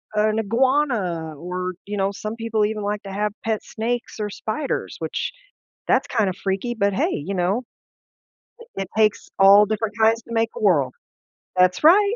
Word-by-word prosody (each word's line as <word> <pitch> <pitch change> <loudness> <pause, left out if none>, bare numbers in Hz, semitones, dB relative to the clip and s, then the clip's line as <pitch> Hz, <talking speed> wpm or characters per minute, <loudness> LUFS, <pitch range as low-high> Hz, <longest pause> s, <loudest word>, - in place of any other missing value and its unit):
an 215 +1 +2
iguana, 225 - 0
or 180 +3 -4
you 205 +1 -4
know, 195 0 +1
some 215 +2 -5
people 225 -2 0
even 210 0 -3
like 205 0 -2
to 195 - -7
have 210 +1 0
pet 220 -1 -1
snakes 235 +1 -3
or 210 -1 -2
spiders, 220 +7 -3
which - - -3 0.6
that's - - +3
kinda 215 -6 +1
freaky, 195 +5 -1
but 200 -2 +1
hey, - - +1 0.2
you 200 - -2
know, 190 +6 0 1.0
it 465 - -13
it 195 -1 -3
takes 215 -2 +2
all 200 +2 +8
different 215 0 -2
kinds 225 +1 +3
to 230 - -11
make 225 0 +1
a - - -5
world. 145 -11 +3 0.6
That's 185 +3 +3
right. 400 +7 +6
210 Hz, 175 wpm, -22 LUFS, 195-225 Hz, 1.0 s, all